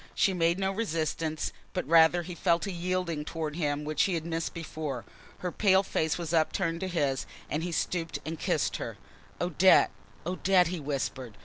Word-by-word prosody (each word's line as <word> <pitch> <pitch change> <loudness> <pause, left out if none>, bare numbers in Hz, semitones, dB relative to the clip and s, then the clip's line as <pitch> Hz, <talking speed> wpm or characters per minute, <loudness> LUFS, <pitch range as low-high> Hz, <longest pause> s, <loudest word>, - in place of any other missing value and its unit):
She 195 - +3
made 170 0 +2
no 195 0 0
resistance, 160 -6 -2 0.2
but - - -2
rather 165 +2 +6
he 180 +2 -6
felt 170 +1 +1
a 200 - -3
yielding 175 -3 -2
towards 160 0 -4
him 145 -2 0
which 150 0 +1
he 190 - 0
had 165 -1 -3
missed 165 -1 -2
before. 155 -6 -5 0.4
Her 180 - -2
pale 190 -1 +4
face 160 -4 0
was 170 -2 -4
upturned 165 +1 +1
to 190 - -2
his 145 -7 0 0.2
and 150 - 0
he 175 +1 -3
stooped 165 0 -1
and 160 0 -4
kissed - - 0
her. - - -5 0.4
"Odette! 180 +2 +5 0.3
Odette!" 180 0 +3
he 180 -1 -3
whispered. 135 -5 -3
165 Hz, 180 wpm, -29 LUFS, 155-180 Hz, 0.4 s, rather